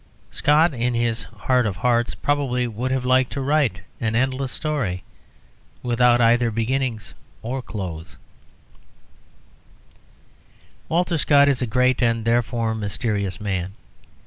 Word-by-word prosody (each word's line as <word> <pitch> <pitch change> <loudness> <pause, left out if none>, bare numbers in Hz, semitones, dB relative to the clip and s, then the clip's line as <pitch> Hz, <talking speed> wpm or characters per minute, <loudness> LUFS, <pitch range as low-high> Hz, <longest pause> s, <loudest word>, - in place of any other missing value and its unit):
Scott, 150 +3 +3
in 120 0 -1
his 115 -1 -1
heart 125 -3 0
of 100 - -3
hearts, 120 +4 +1
probably 135 -4 0
would 120 +2 -3
have 130 -1 -1
liked 130 0 +3
to 140 - -3
write 135 -8 +1 0.2
an 110 -1 -1
endless 130 +2 0
story 130 - -2 0.8
without 120 0 +3
either 120 0 +4
beginning 115 +1 -1 0.4
or 130 +4 -3
close. 90 -9 -7 2.7
Walter 170 0 +1
Scott 140 0 +5
is 140 -3 +1
a 125 - 0
great, 125 +2 +2
and, 115 -1 +1
therefore, 115 -1 +1
mysterious 100 -2 -2
man. 95 -3 -3
120 Hz, 120 wpm, -22 LUFS, 110-130 Hz, 2.7 s, Scott